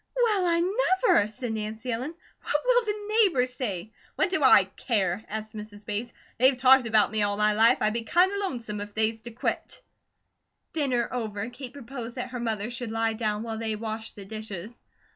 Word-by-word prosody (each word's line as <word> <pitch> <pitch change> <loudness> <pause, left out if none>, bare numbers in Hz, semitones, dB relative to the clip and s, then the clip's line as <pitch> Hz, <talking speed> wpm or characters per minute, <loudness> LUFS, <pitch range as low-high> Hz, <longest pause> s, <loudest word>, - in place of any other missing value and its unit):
"Well, 430 -7 +2
I 335 0 +3
never!" 375 - +3
said 220 +2 -5
Nancy 220 +3 -4
Ellen. 255 +8 -3 0.3
"What - - -3
will - - +4
the 420 0 -3
neighbours 260 - +2
say?" 215 -5 -4 0.2
"What 380 - +1
do 380 - +1
I 260 -7 +8
care?" 195 0 -1
asked 220 +1 -5
Mrs. 210 -1 -9
Bates. 215 +3 -3 0.3
"They've 260 +1 +5
talked 260 -1 +6
about 215 -3 +3
me 220 -1 0
all 205 0 +1
my 210 0 +3
life, 225 +4 +5
I'd 215 0 +2
be 230 0 -2
kinda 360 - +3
lonesome 235 - -3
if 205 0 -8
they's 220 0 +1
to 240 - -8
quit." 235 +1 -4 0.9
Dinner 265 -7 +1
over, 220 -4 -3
Kate 250 +1 -8
proposed 245 -3 -7
that 255 0 -4
her 250 - -4
mother 225 -1 -2
should 240 -1 -4
lie 225 0 0
down 215 -1 -2
while 225 -1 -4
they 220 -1 -2
washed 220 +1 -5
the 200 - -9
dishes. 215 0 -7
230 Hz, 190 wpm, -27 LUFS, 215-265 Hz, 0.9 s, I